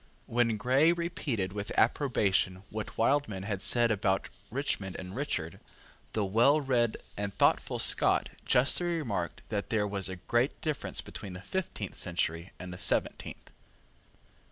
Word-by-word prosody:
When 115 -2 +1
Grey 130 +9 +4
repeated 145 - -2
with 105 0 -4
approbation 100 -7 +2
what 110 0 -5
Wildman 115 -6 +1
had 100 -2 -3
said 120 +1 +3
about 95 -2 0 0.2
Richmond 105 -7 -2
and 95 +2 -7
Richard, 90 - -3 0.5
the 105 -2 +1
well 120 +10 +4
read 125 -5 +1 0.2
and 100 0 -3
thoughtful - - +2
Scot - - +3
justly 140 +7 +3
remarked 120 - -2
that 105 -2 -2
there 110 -2 +1
was 100 -2 -1
a 95 - -4
great 120 - 0
difference 155 -3 -1
between 95 -3 -8
the 90 - -8
fifteenth 130 - -4
century 85 0 -1
and 90 0 -7
the 90 - -8
seventeenth. - - -1
110 Hz, 140 wpm, -30 LUFS, 95-130 Hz, 0.5 s, Grey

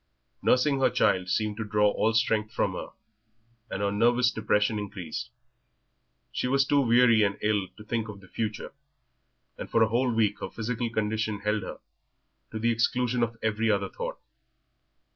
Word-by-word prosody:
Nursing 135 +2 +3
her 135 - +4
child 90 0 +1
seemed 105 +2 0
to 110 - -2
draw 105 -1 +2
all 110 - +1
strength 110 -2 +1
from - - 0
her, - - -5 0.8
and 100 - -3
her 100 - +1
nervous 120 +4 +3
depression 105 -1 +1
increased; 95 -6 -6 1.0
she - - -2
was 135 +1 +3
too 145 0 +3
weary 120 -2 +5
and 100 -1 +1
ill 105 -3 +1
to 105 - -11
think 115 +1 -2
of 100 -2 -8
the 95 - -17
future, 110 +2 -4 0.9
and - - -6
for 115 - +4
a 110 - +1
whole 125 +2 +1
week 110 -3 +1
her - - -5
physical 115 +1 -3
condition 110 -1 -2
held 105 0 0
her, 95 - -7 0.7
to 110 - -6
the 115 +2 +1
exclusion 120 +1 +1
of 115 -1 -1
every 110 0 +1
other 100 -2 +1
thought. - - -5
110 Hz, 170 wpm, -27 LUFS, 105-120 Hz, 1.0 s, weary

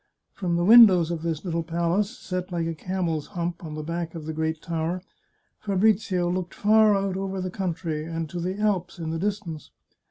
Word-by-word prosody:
From 175 -3 -2
the 175 0 +1
windows 195 -7 +8
of 165 -2 -3
this 165 0 -3
little 170 -2 -1
palace, 170 +5 0
set 185 -3 -5
like 170 -2 -1
a 165 - -2
camel's 165 -2 -2
hump 175 -2 -4
on 155 -2 -6
the 155 - -5
back 170 +1 -4
of 160 -2 -7
the 160 - -4
great 160 0 -2
tower, 170 +2 -3 0.6
Fabrizio 195 -3 +1
looked 180 0 -3
far 215 0 +5
out 195 -1 -1
over 195 0 -3
the 185 0 -3
country, 170 -4 -3
and 165 0 -4
to 175 - -4
the 185 +3 -3
Alps 195 -4 0
in 160 -2 -4
the 165 - -2
distance. 195 -6 -3
175 Hz, 195 wpm, -25 LUFS, 165-190 Hz, 0.6 s, windows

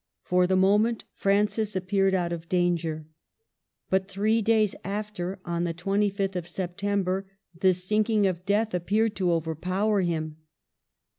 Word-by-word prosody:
For 180 0 +2
the 190 - +2
moment 210 +5 +3
Francis 205 +1 +1
appeared 190 +1 +1
out 175 -2 0
of 165 0 -7
danger. 170 -3 0 0.9
But 190 0 +2
three 210 +4 +1
days 215 -2 +3
after, 200 -2 -4
on 170 0 -1
the 170 -1 -2
25th 195 +1 0
of 175 -2 -3
September, 190 +1 -2 0.3
the 185 +1 +5
sink 210 +5 0
ing 215 -2 +3
of 180 -2 -1
death 210 +3 +1
appeared 205 +5 +1
to 185 -2 +1
overpower 185 +6 0
him. 160 -3 -2
190 Hz, 140 wpm, -26 LUFS, 175-205 Hz, 0.9 s, the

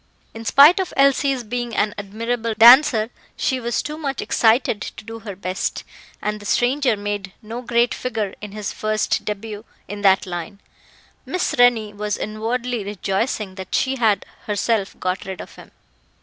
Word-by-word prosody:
In 225 0 -9
spite 290 - +7
of 375 - -3
Elsie's 275 -1 +3
being 240 0 -4
an 210 0 +1
admirable 225 +3 -3
dancer, 235 -1 +7 0.3
she 260 - 0
was 235 -1 -1
too 300 +1 -6
much 275 -5 -3
excited 225 -2 +2
to 210 - -8
do 225 0 -8
her 210 -3 -8
best, 185 0 -3 0.4
and 210 0 -2
the 205 - -12
stranger 250 +1 +2
made 205 -2 -4
no 230 +3 -6
great 240 0 +1
figure 220 -6 -3
in 210 -1 -7
his 210 -1 -5
first 215 0 -1
debut 210 0 -5 0.2
in 205 +1 -6
that 195 -1 +4
line. 175 +2 -6 0.6
Miss 365 0 -2
Rennie 235 -4 +4
was 210 0 -3
inwardly 230 +2 -3
rejoicing 200 +1 -2
that 185 - -4
she 270 0 +1
had 220 -4 +2 0.2
herself 210 -1 -1
got 185 +1 -2
rid 190 -1 -6
of - - -9
him. - - -14
220 Hz, 165 wpm, -21 LUFS, 205-245 Hz, 0.6 s, spite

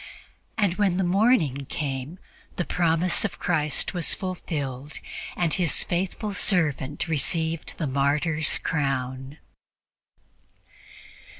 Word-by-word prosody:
And 200 -5 +1
when 195 -4 +2
the 190 - +1
morning 175 - +2
came, 140 +2 -4 0.4
the 175 - -2
promise 170 +1 +2
of - - -2
Christ 155 -2 0
was 175 -3 +3
fulfilled, 145 -7 -4 0.4
and 170 -3 +1
His 175 -4 +3
faithfu1 195 +4 -2
servant 150 -6 +1
received 160 +1 -1
the 155 - -2
martyr's 145 +3 +1
crown. 135 -2 -2
160 Hz, 100 wpm, -25 LUFS, 140-180 Hz, 0.4 s, was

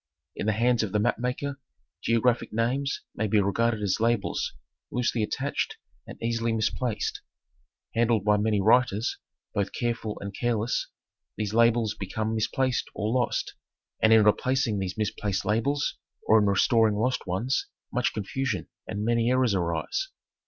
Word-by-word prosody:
In - - -3
the 110 - +3
hands 120 +2 +2
of 110 -4 -3
the 105 - +2
map 120 +4 +1
maker 135 +3 -3 0.4
geographic 115 +1 +1
names 125 +5 -1
may 110 - -1
be 105 +1 +3
regarded 110 +2 +1
as 100 0 +1
labels 115 -2 0 0.4
loosely 120 -2 0
attached 135 +6 -2 0.3
and - - -10
easily 115 0 0
misplaced. 110 +1 -1 0.7
Handled 115 -3 +2
by 105 0 +4
many 105 0 +1
writers, 110 +1 +3 0.3
both 100 -1 -1
careful 115 -3 -2
and 100 0 -6
careless, 120 -1 0 0.5
these' 105 -1 -2
labels 115 -1 +3
become 110 +3 -3
misplaced 125 +3 0
or 105 0 -1
lost; 125 -2 0 0.5
and 110 - +5
in 110 -1 +7
replacing 115 +1 +2
these 95 +1 -3
misplaced 105 -2 -1
labels 140 +7 0 0.3
or 110 - +6
in 105 - +2
restoring 110 +2 +3
lost 120 0 0
ones 100 +9 0 0.3
much 125 0 +1
confusion 105 - -3 0.2
and 105 0 -3
many 115 0 +2
errors 130 -3 +3
arise. 95 - -1
115 Hz, 145 wpm, -27 LUFS, 105-125 Hz, 0.7 s, in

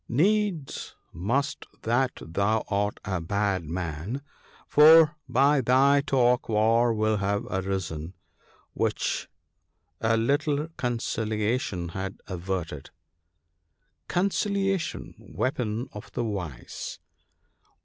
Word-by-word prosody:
Needs 185 - 0 0.2
must 135 - -1 0.2
that 125 +3 +1
thou 100 +6 0
art 100 0 0
a 95 -3 -2
bad 100 0 0
man; 85 - -4 0.4
for 155 +1 +7
by 140 +2 +4
thy 135 +3 +4
talk 125 -4 +2
war 115 +2 +3
will 110 -1 +1
have 100 +3 -1
arisen, 95 -3 -3 0.6
which - - -1 0.7
a 115 0 +2
little 145 +5 +1
conciliation 110 -5 -1
had 95 +3 -5
averted: 90 -6 -4 0.5
— 85 +2 -50
" - - -48
Conciliation! 195 -1 0
— - - -37 0.2
weapon 120 0 -1
of 105 - -9
the 120 - -1
wise 90 - -5
110 Hz, 100 wpm, -27 LUFS, 95-135 Hz, 0.7 s, for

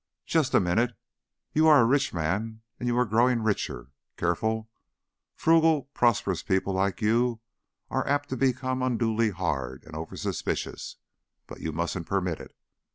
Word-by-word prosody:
"Just 160 -5 +1
a - - +7
minute. 110 +6 +1 0.6
You 155 +1 +4
are 150 -2 +8
a 115 - +5
rich 135 +3 +2
man 105 +7 -2 0.2
and 120 - -3
you 120 0 +1
are 125 - +3
growing 115 +2 +2
richer. 85 - -2 0.3
Careful, 110 +6 0 0.7
frugal, 160 -3 +3
prosperous 100 -7 +2
people 95 +1 0
like 100 +4 0
you 115 +2 +2 0.5
are - - -1
apt 145 +1 0
to 130 - -2
become 130 0 0
unduly 115 -3 +1
hard 70 -9 -3
and 80 - -13
oversuspicious; 80 +1 -4 0.5
but - - -10
you 80 - -3
mustn't 85 +2 -3
permit 90 -4 -1
it. - - -12
110 Hz, 150 wpm, -27 LUFS, 90-130 Hz, 0.7 s, are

